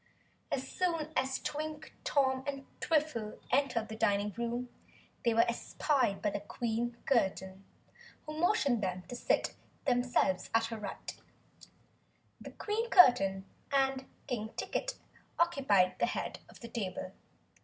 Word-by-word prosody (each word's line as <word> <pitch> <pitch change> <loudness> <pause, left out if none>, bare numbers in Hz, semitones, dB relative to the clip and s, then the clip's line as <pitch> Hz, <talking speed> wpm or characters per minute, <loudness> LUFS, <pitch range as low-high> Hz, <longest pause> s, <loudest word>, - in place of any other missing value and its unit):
As 265 0 -1
soon 330 -3 -1
as 265 0 +1
Twink, 305 +1 -5
Tom, 265 -2 +2
and 275 -1 -4
Twiffle 295 -9 0
entered 250 -4 +2
the 220 - -6
dining 205 -2 +1
room, 235 +1 -2 0.6
they 235 - +3
were 230 +1 +5
espied 235 -1 0
by 205 - +2 0.2
Queen 235 0 -2
Curtain 190 -6 +1 0.6
who 305 - -6
motioned 310 - +3
them 185 -2 -2
to 245 - -5
seat - - +1 0.3
themselves 245 -8 +2
at 225 0 +4
her 225 - -5
right. 205 -2 -6 1.4
Queen 450 +2 -1
Curtain 195 - +6 0.3
and 270 -1 +2 0.2
King 220 -3 -3
Ticket - - -2 0.4
occupied 265 - +3
the - - +3
head - - -3
of - - -15
the 235 - -7
table. 195 -5 -4
245 Hz, 125 wpm, -33 LUFS, 215-280 Hz, 1.4 s, Curtain